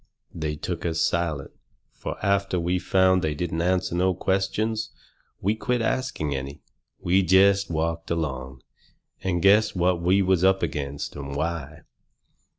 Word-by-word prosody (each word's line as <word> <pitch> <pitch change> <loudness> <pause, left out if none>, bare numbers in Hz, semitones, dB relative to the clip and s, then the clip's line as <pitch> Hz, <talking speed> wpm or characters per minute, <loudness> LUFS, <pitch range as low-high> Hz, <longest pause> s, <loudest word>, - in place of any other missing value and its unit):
They 75 -2 -3
took 85 +3 -5
us 85 -1 -1
silent, 80 -5 0 0.4
fur - - -6
after 100 -2 +1
we 90 +2 0
found 95 0 +3
they 75 -2 -1
didn't 80 0 -2
answer 90 0 0
no 90 +1 +2
questions 100 +4 -1 0.5
we 100 +3 +2
quit 125 +3 -1
asking 125 - -1
any. 70 +2 -6 0.4
We 95 +3 +3
jest 95 +2 +4
walked 85 0 -2
along, 65 -6 -3 0.6
and 85 -3 -1
guessed 105 +2 +5
what 90 -1 +1
we 95 +3 +3
was 95 -1 +2
up 95 0 +3
against, 70 -3 -4
and 70 -1 -6
why. 80 -1 -3
90 Hz, 145 wpm, -25 LUFS, 80-95 Hz, 0.6 s, guessed